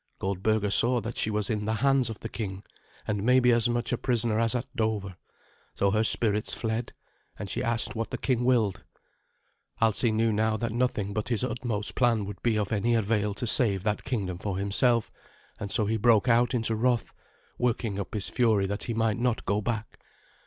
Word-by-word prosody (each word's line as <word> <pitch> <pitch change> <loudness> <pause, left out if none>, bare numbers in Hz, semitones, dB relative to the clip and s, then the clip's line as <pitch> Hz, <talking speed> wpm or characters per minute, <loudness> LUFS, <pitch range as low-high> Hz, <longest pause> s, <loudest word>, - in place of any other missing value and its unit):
Goldberga 100 +2 0
saw 120 +4 +3
that 115 +3 -5
she - - 0
was 105 -1 -1
in 105 -2 -2
the 110 +1 0
hands 135 +1 +2
of 110 - -7
the - - -4
king, 100 -4 -6 0.4
and 105 -2 -1
maybe 125 +2 +4
as 115 0 +2
much 120 +1 -1
a 120 - -1
prisoner 115 -3 +1
as 115 +1 +2
at 125 +1 -1
Dover. 110 -5 -1 0.6
So 100 0 +1
her 110 +2 +2
spirits 105 -1 +2
fled, 115 +1 -3 0.4
and 100 -2 -6
she - - -2
asked 120 +1 0
what 115 0 -3
the - - -4
king 125 -3 0
willed. 115 -7 +1 1.0
Alsi 115 +1 +2
knew 110 +1 +1
now 110 +1 +1
that 115 0 -2
nothing 115 -4 -1
but 110 +3 -3
his 120 -1 0
utmost 120 -5 -2
plan 115 -5 +2
would 100 0 -8
be 115 -2 +1
of 105 -1 -2
any 115 +2 +1
avail 105 -2 0
to 120 - -4
save 105 -5 +3
that 105 0 -1
kingdom 95 -8 -3
for 100 -2 -3
himself, 110 +4 +1 0.5
and 100 -2 -5
so 110 - +1
he 110 +2 0
broke 115 +1 +4
out 120 +1 +3
into 115 -1 0
wrath, 120 0 0 0.5
working 115 -4 -1
up 100 +2 -5
his 105 - -1
fury 110 -5 +2
that 100 +2 -3
he 115 - -3
might 115 -1 0
not 120 -1 0
go 100 +2 0
back. 110 0 -4
110 Hz, 200 wpm, -27 LUFS, 105-120 Hz, 1.0 s, maybe